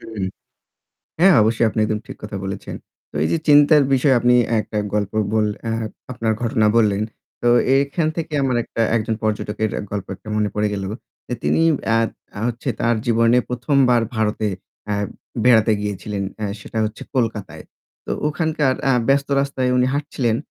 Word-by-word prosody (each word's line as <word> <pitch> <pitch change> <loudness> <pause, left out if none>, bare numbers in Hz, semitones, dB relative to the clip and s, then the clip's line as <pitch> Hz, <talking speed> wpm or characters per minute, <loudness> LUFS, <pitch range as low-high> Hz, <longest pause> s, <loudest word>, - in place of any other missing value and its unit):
হুম। 110 -4 -5 1.0
হ্যাঁ 190 +1 +7
অবশ্যই 115 +2 +2
আপনি 110 - -2
একদম 105 0 -1
ঠিক - - -9
কথা 105 -1 -6
বলেছেন। 95 0 -5 0.4
তো - - -30
এই - - +1
যে 165 - +2
চিন্তার 145 0 +7
বিষয়ে 130 0 +4
আপনি 125 0 +4 0.3
একটা 105 - -4 0.2
গল্প 105 -2 -1 0.2
বললে 105 -1 +1
অ্যা 115 - -1 0.4
আপনার 115 -2 -1
ঘটনা 110 -2 +2
বললেন। 105 -2 +3 0.4
তো 120 - +3 0.3
এখান 140 +3 0
থেকে 165 -2 -4
আমার 130 -2 +1
একটা - - -6 0.2
একজন 110 0 -1
পর্যটকের 110 0 -1
অ্যা - - -2
গল্প 100 -2 -3
একটা 110 - -15
মনে 105 -1 +1
পড়ে 105 0 +1
গেল। 100 - -4 0.4
যে 125 - -2
তিনি - - +2 0.2
অ্যা 115 - +3 0.3
তা - - -10
হচ্ছে 120 +3 -5
তার 115 0 +2
জীবনে 115 +1 +4
১ম 125 +4 -1
বার 120 -2 +4
ভারতে 110 0 0 0.4
অ্যা 105 - -1 0.5
বেড়াতে 115 -3 +5
গিয়েছিলেন। 105 0 -4 0.2
অ্যা 105 - -2
সেটা 110 - -6
হচ্ছে 110 0 -5
কলকাতায়। 110 -5 -2 0.4
তো - - -6 0.2
ওখানকার 155 -3 0
অ্যা 135 -2 +3
ব্যস্ত 140 0 +2
রাস্তায় 135 -2 -1
উনি 125 0 +3
হাঁটছিলেন। 130 -6 -1
115 Hz, 170 wpm, -21 LUFS, 105-130 Hz, 1.0 s, হ্যাঁ